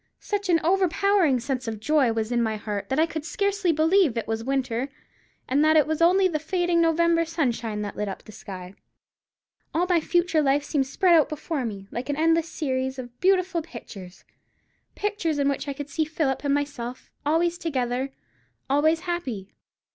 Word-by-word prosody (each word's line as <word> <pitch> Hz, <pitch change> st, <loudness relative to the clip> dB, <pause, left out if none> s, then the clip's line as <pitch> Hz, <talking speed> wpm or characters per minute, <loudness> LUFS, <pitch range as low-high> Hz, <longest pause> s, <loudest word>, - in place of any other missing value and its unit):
Such 405 Hz, -2 st, -3 dB
an 335 Hz, -2 st, +5 dB
overpowering 370 Hz, -4 st, +3 dB
sense 255 Hz, 0 st, -3 dB
of 220 Hz, -2 st, -4 dB
joy 275 Hz, +1 st, +3 dB
was 225 Hz, 0 st, -2 dB
in 240 Hz, -1 st, +2 dB
my 220 Hz, -1 st, 0 dB
heart, 205 Hz, -1 st, -4 dB
that 265 Hz, -, 0 dB
I 315 Hz, -, +5 dB
could 320 Hz, -2 st, -5 dB
scarcely 400 Hz, +1 st, 0 dB
believe 320 Hz, -, +3 dB
it 230 Hz, -, -1 dB
was 225 Hz, 0 st, -2 dB
winter, 260 Hz, -1 st, -1 dB, 0.6 s
and 280 Hz, +3 st, +2 dB
that 310 Hz, 0 st, +5 dB
it 300 Hz, -, +5 dB
was 315 Hz, +1 st, -2 dB
only 370 Hz, +3 st, +5 dB
the 315 Hz, -4 st, -2 dB
fading 350 Hz, +1 st, +1 dB
November 335 Hz, 0 st, +3 dB
sunshine 240 Hz, -10 st, -2 dB
that 205 Hz, -, -5 dB
lit 210 Hz, -, -2 dB
up 195 Hz, -, -6 dB
the 215 Hz, -, -12 dB
sky. 185 Hz, -3 st, -9 dB, 1.0 s
All 345 Hz, +2 st, +3 dB
my 350 Hz, -3 st, +3 dB
future 345 Hz, -1 st, +2 dB
life 280 Hz, 0 st, +2 dB
seemed 285 Hz, -2 st, 0 dB
spread 335 Hz, +2 st, +4 dB
before 305 Hz, -2 st, -3 dB
me, 200 Hz, -3 st, -6 dB
like 245 Hz, +4 st, -5 dB
an 285 Hz, -, 0 dB
endless 330 Hz, +1 st, +2 dB
series 265 Hz, -3 st, -2 dB
of 245 Hz, -1 st, -9 dB
beautiful 370 Hz, -2 st, +2 dB
pictures—pictures 300 Hz, -, -7 dB
in 280 Hz, -1 st, +1 dB
which 280 Hz, +1 st, -1 dB
I 280 Hz, -, -2 dB
could 285 Hz, +1 st, -7 dB
see 315 Hz, -, 0 dB
Philip 305 Hz, -4 st, -1 dB
and 285 Hz, -, +1 dB
myself, 270 Hz, -4 st, -4 dB
always 335 Hz, +3 st, +1 dB
together, 260 Hz, -3 st, -2 dB, 0.6 s
always 310 Hz, +4 st, +2 dB
happy. 275 Hz, -, -4 dB
295 Hz, 180 wpm, -25 LUFS, 245-335 Hz, 1.0 s, an